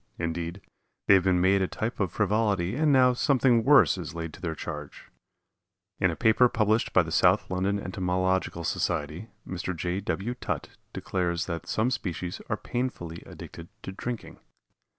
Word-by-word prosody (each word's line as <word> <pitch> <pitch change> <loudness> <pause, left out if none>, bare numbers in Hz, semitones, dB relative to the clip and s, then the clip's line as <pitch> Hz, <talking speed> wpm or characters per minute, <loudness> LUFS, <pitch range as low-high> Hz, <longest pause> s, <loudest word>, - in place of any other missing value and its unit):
Indeed, 85 +2 -3 0.4
they - - +6
have 95 -2 +4
been 90 -2 +3
made 95 +2 +3
a 95 - +1
type 110 +6 -4
of 100 -4 0
frivolity 105 -2 +1
and 150 +1 +3
now 130 -2 +5
something 125 -2 +3
worse 135 -7 +5
is 85 -2 -6
laid 80 -2 -5
to - - -12
their 80 -3 -3
charge. 75 -3 -7 0.9
In 95 - +3
a 85 - -3
paper 120 +4 +4
published 110 0 +1
by 90 - +5
the 80 - -7
South 90 +5 +3
London 95 +2 0
Entomological 95 -1 -1
Society 80 +6 -2 0.2
Mr. 90 0 -4
J. 90 +3 -2
W. 100 +3 -2
Tutt 125 - -4 0.2
declares 85 -2 -2
that 85 -2 -5
some 115 +4 +1
species 90 -4 -4
are 105 - 0
painfully 105 -11 -4
addicted 85 - -10 0.2
to - - -5
drinking. 120 +4 -6
95 Hz, 165 wpm, -27 LUFS, 85-110 Hz, 0.9 s, they